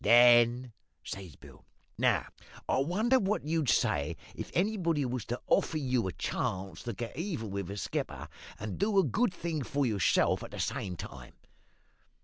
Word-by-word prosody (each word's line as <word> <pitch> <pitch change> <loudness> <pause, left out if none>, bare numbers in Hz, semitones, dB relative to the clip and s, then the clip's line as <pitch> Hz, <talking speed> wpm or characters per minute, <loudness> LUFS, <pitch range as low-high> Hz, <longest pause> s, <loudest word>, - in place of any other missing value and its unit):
"Then 120 +1 +6 0.3
says 95 -6 -7
Bill, - - -15 0.4
`Now, - - +2 0.4
I - - +2
wonder 215 - +3
what 200 -5 0
you'd 155 -3 +1
say 80 - +2 0.2
if - - -6
anybody 175 -6 +1
was 125 -3 -3
to 120 +3 -3
offer 160 - +2
you 130 -7 0
a - - -2
chance 95 0 -3
to 120 - -4
get 115 +3 -6
even 160 - -3
with 100 -2 -3
the 100 +2 -6
skipper, 95 - -3 0.3
and 105 -2 -5
do 200 +1 +2
a 195 - +7
good 240 +1 +1
thing 170 -3 -3
for 140 +2 0
yourself 105 -6 +2
at - - -7
the - - -8
same 90 -2 -2
time?' - - -9
125 Hz, 165 wpm, -31 LUFS, 105-170 Hz, 0.4 s, a